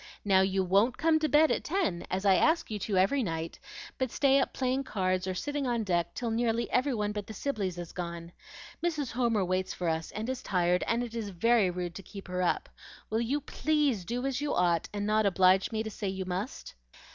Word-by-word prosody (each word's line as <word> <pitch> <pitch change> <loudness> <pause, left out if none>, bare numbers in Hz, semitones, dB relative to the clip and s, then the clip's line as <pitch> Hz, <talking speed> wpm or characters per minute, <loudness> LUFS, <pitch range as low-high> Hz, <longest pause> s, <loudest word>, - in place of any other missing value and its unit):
Now, 190 -2 +5
you 190 0 +1
WON'T 200 +7 +3
come 320 0 +3
to 310 -1 0
bed 300 +3 +5
at - - 0
ten, 305 - -1
as 190 +2 -2
I 195 - +6
ask 320 - +2
you 210 - -3
to 200 0 -1
every 200 +10 +3
night, 165 -5 -4 0.4
but 260 -1 0
stay 275 +2 +3
up - - 0
playing 260 +1 -1
cards 185 -5 -1
or 185 - -2
sitting 290 +6 -2
on 235 -2 0
deck 175 -3 -1
till 235 -2 -2
nearly 230 0 0
every 255 +1 +2
one 210 -1 -1
but 210 -1 -5
the 220 - -8
Sibleys 200 -9 -2
is 175 -1 -6
gone. 170 -1 -6 0.5
Mrs. 305 -7 -1
Homer 230 -5 +1
waits 185 +1 -1
for 180 - -3
us, 160 0 -1
and 215 +2 -4
is 260 -1 -3
tired, 180 -1 +1
and 235 +1 +1
it 235 -2 -7
is 225 -3 -3
very 205 +2 +3
rude 175 -1 -4
to 195 - -8
keep 195 +1 -10
her 180 0 -1
up. 180 - 0 0.4
Will 220 +1 +1
you 270 +5 0
PLEASE 295 -8 0
do 245 +5 -3
as 270 0 -1
you 295 - -1
ought, 175 -2 +2
and 205 0 -3
not 215 0 +3
oblige 190 +1 +4
me 220 -1 -1
to 220 - -5
say 200 - -4
you 190 0 -3
must?" 185 +8 -5
210 Hz, 230 wpm, -30 LUFS, 185-250 Hz, 0.5 s, I